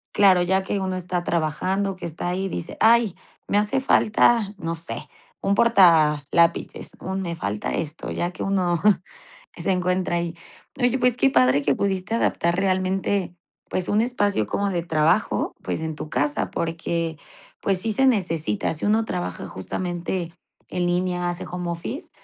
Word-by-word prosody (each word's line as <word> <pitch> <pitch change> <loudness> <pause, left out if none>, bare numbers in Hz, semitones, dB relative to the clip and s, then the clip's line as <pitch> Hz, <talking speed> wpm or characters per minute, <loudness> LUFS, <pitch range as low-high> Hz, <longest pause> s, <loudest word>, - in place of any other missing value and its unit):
Claro, 190 -3 +6
ya 190 +2 +1
que 195 +1 -2
uno 190 -1 -2
está 180 -1 -3
trabajando, 185 +5 -1
que - - -7
está 170 +2 -4
ahí, 190 +2 -1
dice: 170 -2 -5
"Ay, 230 -3 +4 0.3
me 205 - +2
hace 210 +6 +1
falta, 220 -3 +3
no 165 +1 -3
sé, 165 0 -4 0.3
un 200 0 +1
portalápices, 170 -7 +3
un 190 +1 -3
me 170 -2 -3
falta 105 -7 -3
esto, 155 +1 -4
ya 175 +1 -2
que - - -10
uno 180 -4 +1 0.8
se 195 - 0
encuentra 180 -1 0
ahí". 170 0 -2 0.4
Oye, 245 +1 +2
pues, 250 -1 +2
qué 270 - +3
padre 130 - +4
que 140 -1 +2
pudiste 195 +2 -1
adaptar 170 -6 +1
realmente, 190 -1 0 0.4
pues, 185 - -1
un 210 +2 +3
espacio 205 - 0
como 200 - -1
de 175 -3 -1
trabajo, 165 +4 +1
pues, - - -3
en 160 -1 -3
tu 155 - -7
casa, 145 0 0
porque, 165 0 -2 0.5
pues, 190 -2 +1
sí 220 0 0
se 270 - +3
necesita, 165 - +1
sí 155 - -5
uno 220 +2 +2
trabaja 175 -2 -4
justamente 175 -1 -4 0.3
en 180 -1 -2
línea, 180 0 0
hace 175 - -5
home 180 -1 -3
office, 220 - -5
180 Hz, 160 wpm, -23 LUFS, 170-200 Hz, 0.8 s, Claro